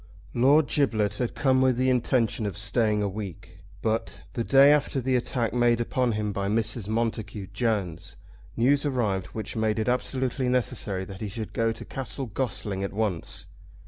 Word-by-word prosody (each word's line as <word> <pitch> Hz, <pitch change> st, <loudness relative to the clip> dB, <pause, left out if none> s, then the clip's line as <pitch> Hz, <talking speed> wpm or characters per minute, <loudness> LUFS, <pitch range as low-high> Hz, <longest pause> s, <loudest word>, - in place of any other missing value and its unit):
Lord 140 Hz, +6 st, +5 dB
Giblet 110 Hz, -8 st, +1 dB
had 125 Hz, -2 st, -2 dB
come 130 Hz, -2 st, +3 dB
with 130 Hz, -2 st, +3 dB
the 130 Hz, +1 st, +2 dB
intention 120 Hz, -3 st, +1 dB
of 100 Hz, -, -5 dB
staying 110 Hz, -1 st, +1 dB
a -, -, +1 dB
week, 95 Hz, -3 st, -7 dB, 0.2 s
but, 115 Hz, 0 st, -2 dB
the 115 Hz, -, -1 dB
day 135 Hz, +3 st, +6 dB
after 145 Hz, -2 st, +2 dB
the 130 Hz, 0 st, 0 dB
attack 120 Hz, -3 st, 0 dB
made 120 Hz, -1 st, +3 dB
upon 120 Hz, 0 st, 0 dB
him 105 Hz, -1 st, -2 dB
by 100 Hz, 0 st, -2 dB
Mrs. 110 Hz, 0 st, -1 dB
Montacute 110 Hz, -3 st, -2 dB
Jones, 105 Hz, -7 st, -2 dB, 0.4 s
news 140 Hz, +5 st, +3 dB
arrived 110 Hz, -10 st, 0 dB
which 110 Hz, -, -6 dB
made 110 Hz, -1 st, 0 dB
it 110 Hz, -, -1 dB
absolutely 130 Hz, +1 st, 0 dB
necessary 105 Hz, -6 st, 0 dB
that 95 Hz, 0 st, -10 dB
he 110 Hz, -, -2 dB
should 110 Hz, +2 st, -6 dB
go 115 Hz, 0 st, +1 dB
to 115 Hz, -, -7 dB
Castle 135 Hz, +1 st, -4 dB
Gossling 105 Hz, -4 st, -2 dB
at 100 Hz, -, -3 dB
once. 100 Hz, -6 st, -2 dB
115 Hz, 175 wpm, -26 LUFS, 105-125 Hz, 0.4 s, day